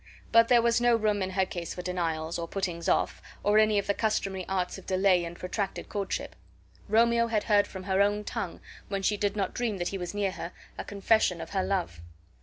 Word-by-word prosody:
But 230 0 +6
there 240 -1 +5
was 235 0 +3
no 240 -1 +5
room 210 -2 +1
in 190 - -1
her 190 0 +1
case 175 -3 -5
for 180 - -6
denials, 170 -2 -2
or 170 - -3
puttings 175 -2 -3
off, - - +1 0.2
or 210 +1 +4
any 215 -1 +4
of 200 - +1
the 200 - +1
customary 195 -4 -1
arts 190 0 -1
of 190 - -17
delay 185 -1 +3
and 170 0 -6
protracted 195 +2 -4
courtship. 200 -2 -3 0.5
Romeo 235 +2 +4
had 220 -2 0
heard 205 -2 +3
from 190 -1 -8
her 190 0 +1
own 205 +1 +2
tongue, - - -5 0.3
when 195 -1 -3
she 210 - +2
did 205 0 -1
not 195 -3 -1
dream 230 -4 -1
that 175 -1 -2
he 195 - -4
was 180 +2 -5
near 200 -2 0
her, 180 - -7 0.2
a - - -5
confession 200 -3 +2
of 165 0 -7
her 190 -2 0
love. 175 - -2
195 Hz, 220 wpm, -28 LUFS, 180-210 Hz, 0.5 s, But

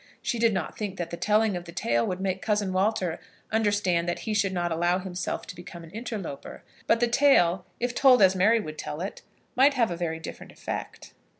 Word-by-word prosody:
She 235 - -1
did 225 -4 +3 0.2
think 200 -3 -4
that 170 -1 -4
the - - -3
telling 210 +2 +2
of 175 0 -5
the 170 - -9
tale 115 -8 0
would 185 - -3
make 190 -1 -2
Cousin 205 -3 0
Walter 190 -3 0 0.3
understand 205 -6 +1
that 175 - -3
he 220 - -1
should 200 -2 +1
not 175 -2 -1
allow 175 +2 +2
himself 185 -1 -4
to - - -9
become 175 -1 -10
an 165 - -13
interloper; 210 - -6 0.2
but 230 - +4
the 240 - +3
tale, 215 -9 +3
if 245 0 -1
told 260 -1 +6
as 190 0 +5
Mary 215 +5 +4
would 155 -7 -7
tell 150 - -5
it, 195 - -5 0.3
might 275 +2 +5
have 235 -6 +2
a - - -2
very 165 -2 -3
different 160 - -9
effect. - - -7
190 Hz, 210 wpm, -27 LUFS, 175-220 Hz, 0.3 s, told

